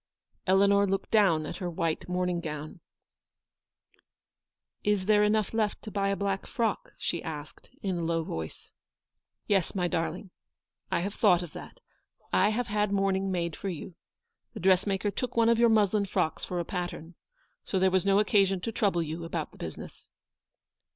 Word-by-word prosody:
Eleanor 200 +1 +5
looked 195 0 -2
down 185 -8 +4
at - - -5
her 180 -3 -3
white 165 0 -2
morning 180 -1 0
gown. 155 0 -6 2.0
"Is 205 -2 +1
there 210 0 +5
enough 210 0 +1
left 215 -2 0
to 215 - -7
buy 200 -1 0
a 200 - +1
black 195 -1 -2
frock?" 225 -3 -2
she 170 - -2
asked, 150 -2 -8
in 185 -3 -1
a - - -2
low 165 0 0
voice. 80 - -6 0.4
" - - -60
Yes, 195 -2 +1
my 180 -2 +1
darling. 175 +3 -3 0.6
I - - +1
have 200 +3 -3
thought 180 -6 +4
of 170 - -9
that. - - -10 0.5
I 195 +3 +4
have 240 +3 0
had 210 -1 0
mourning 195 -1 +1
made 170 -3 -1
for 195 - -4
you. 180 +1 -6 0.6
The - - -5
dress 190 +1 +3
maker 200 +1 0
took 250 +3 -4
one 230 0 +5
of 235 -1 +3
your 235 0 +6
muslin 210 -2 +3
frocks 160 -4 -1
for 180 - -3
a 170 - -2
pattern, 175 -2 -5 0.5
so 195 - -2
there 190 0 +3
was 185 -1 +3
no 195 0 +3
occasion 195 -2 +3
to 230 - -3
trouble 195 -6 +1
you 160 +2 -5
about 165 -2 -4
the - - -17
business." 80 - -8
190 Hz, 180 wpm, -29 LUFS, 170-205 Hz, 2.0 s, your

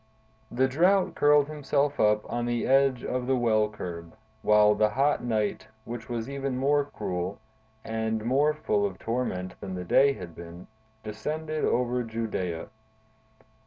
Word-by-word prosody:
The 130 +2 +2
Drought 180 +8 +3
curled 145 -1 +4
himself 145 -1 -1
up 105 0 +3
on 120 0 -2
the 120 -1 -1
edge 135 -1 +3
of 125 -1 -2
the 135 - +3
well 110 -3 +2
curb, 85 -4 -8 0.3
while 105 0 +5
the 105 +1 +2
hot 140 +6 +1
night, 110 -4 -1 0.2
which 120 -1 -7
was 115 -1 -3
even 140 -2 -3
more 145 +2 +2
cruel, 90 -7 -4 0.5
and 110 0 -2
more 145 +5 +2
full 105 -9 0
of 100 -2 -2
torment 105 -6 -3
than 95 -1 -5
the 90 0 -5
day 140 +10 +4
had 90 -9 -9
been, 85 +2 -10 0.4
descended 155 +8 -4
over 125 0 +1
Judea. 110 -7 -4
120 Hz, 150 wpm, -27 LUFS, 105-140 Hz, 0.5 s, while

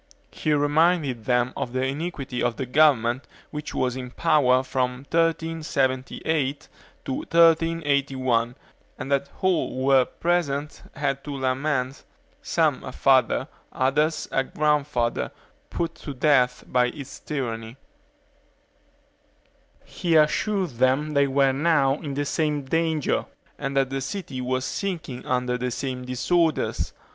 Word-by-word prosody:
He 155 - -2
reminded 145 -4 +2
them 125 0 +1
of 120 - -4
the 130 0 0
iniquity 140 -3 -3
of 120 -1 0
the 130 - -3
government 130 -3 +3 0.2
which 150 0 -6
was 125 -1 0
in 125 -1 -6
power 130 -3 +3
from 130 0 -2
1378 155 -3 0 0.4
to 135 - -2
1381, 140 -8 +2 0.4
and 140 - -6
that 140 0 +1
all 185 -3 +2
who 130 +1 -3
were 135 -2 +5
then - - -22
present 150 -4 0
had 140 -1 -1
to 145 -1 -5
lament, 130 0 -1 0.4
some - - +1
a - - -6
father, - - +3 0.2
others 150 +4 +1
a 135 - +2
grandfather, 145 -4 0 0.4
put 165 -1 -2
to 145 -3 -8
death 125 -3 +3
by 125 -1 +2
its 140 +1 -8
tyranny. 115 -5 -4 2.1
He 170 -2 -1
assured 180 +4 +2
them 130 +5 +1
they 140 -1 +3
were 135 0 +3
now 140 -2 +2
in 145 -4 -5
the 145 +1 -1
same 150 -1 0
danger, 160 +1 0 0.3
and 135 0 -3
that 135 -1 +2
the 135 0 -2
city 135 -3 -5
was 130 +1 -1
sinking 170 -10 -4
under 125 -1 0
the 125 0 -1
same 125 0 -4
disorders. 160 +6 0
140 Hz, 130 wpm, -25 LUFS, 130-155 Hz, 2.1 s, were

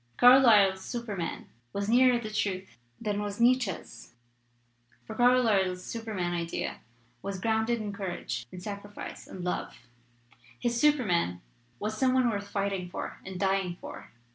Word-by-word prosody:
Carlyle's 220 -7 +7
Superman 215 -8 -4 0.3
was 200 0 -2
nearer 250 +2 +5
the 215 -2 -5
truth 190 - -2 0.2
than 210 -2 -1
was 205 0 -4
Nietz 250 +1 +5
sche's, 185 -8 -8 0.9
for - - -7
Carlyle's 220 -7 +3
Superman 210 -7 -3
idea 170 -1 -3 0.4
was 195 -1 -4
grounded 220 +3 +1
in 210 -2 -4
courage 175 - -4
and 180 - -9
sacrifice 205 0 -7
and 185 - -8
love; 180 - -3 0.8
his 235 -1 0
Superman 195 - +2 0.4
was 215 - -3
some 260 -1 +3
one 250 -2 +3
worth 200 -1 -3
fighting 195 -3 -2
for - - -6
and 190 -1 -7
dying 190 -2 +1
for. - - -9
205 Hz, 140 wpm, -29 LUFS, 185-235 Hz, 0.9 s, Carlyle's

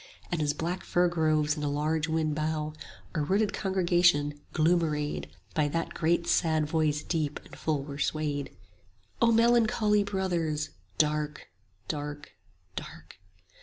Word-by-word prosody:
And 170 -3 0
as 145 -1 +1
black 175 +3 -3
fir 175 0 +2
groves 155 -3 +2
in 150 - -5
a 145 - 0
large 155 +2 0
wind 160 -1 0
bow, 155 0 -2 0.4
Our 155 - 0
rooted 200 +6 +1
congregation, 175 -7 +2
gloom 170 +2 +3
arrayed, 150 -2 -2 0.2
By 150 -2 +2
that 165 +3 -2
great 170 +1 +1
sad 160 -3 +2
voice 150 -1 +1
deep 155 -4 -1
and - - -12
full 150 -3 -1
were 140 0 -7
swayed: 145 -2 -1 0.7
O 230 0 +5
melancholy 225 -2 +4
Brothers, 175 -6 -1 0.3
dark, 150 0 0 0.4
dark, 145 -1 -5 0.4
dark! - - -9
155 Hz, 135 wpm, -29 LUFS, 150-175 Hz, 0.7 s, O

